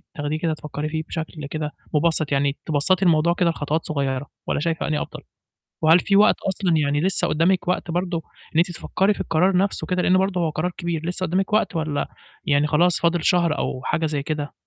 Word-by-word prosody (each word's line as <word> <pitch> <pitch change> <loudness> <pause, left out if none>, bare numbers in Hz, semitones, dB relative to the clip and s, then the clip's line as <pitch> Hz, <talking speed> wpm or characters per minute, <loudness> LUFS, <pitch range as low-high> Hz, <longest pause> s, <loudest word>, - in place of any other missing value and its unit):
تاخديه 150 0 -2
كده 160 -2 0
تفكري 150 0 -5
فيه 160 0 -3
بشكل 160 -2 -5
كده 150 -1 -3 0.2
مُبسَّط، 155 -1 +2
يعني 140 0 +1
تبسَّطي 175 +5 +2
الموضوع 170 0 +4
كده 175 -1 +1
لخطوات 155 0 -2
صغيرة، 140 -2 -2 0.2
والّا - - 0
شايفة 165 +2 -1
أنهي 150 -1 0
أفضل؟ - - -7 0.6
وهل 160 +3 +6
في 200 - +2
وقت 210 +2 +6
أصلًا 185 -3 +1
يعني 145 -1 +1
لسّه 185 +4 +1
قُدّامِك 175 +3 +1
وقت 180 -1 -1
برضه 175 -1 -1 0.3
إن - - +1
أنتِ 175 +2 +3
تفكّري 195 +3 0
في - - -10
القرار 180 +4 +2
نَفْسه 190 -3 0
كده، 180 +1 0
لإن 185 +1 +4
برضه 190 -1 0
هو 165 -2 +1
قرار 155 +4 -2
كبير، 165 -2 -3
لسّه 180 +1 -1
قُدّامِك 185 +5 -1
وقت 215 -4 +1
والّا 155 -2 -1 0.4
يعني 145 0 +3
خلاص، 165 +3 +3
فاضل 170 0 +1
شهر 175 -4 +2
أو 130 - -3
حاجة 160 - 0
زي 150 -2 -2
كده؟ 150 0 -4
165 Hz, 205 wpm, -22 LUFS, 150-180 Hz, 0.6 s, وهل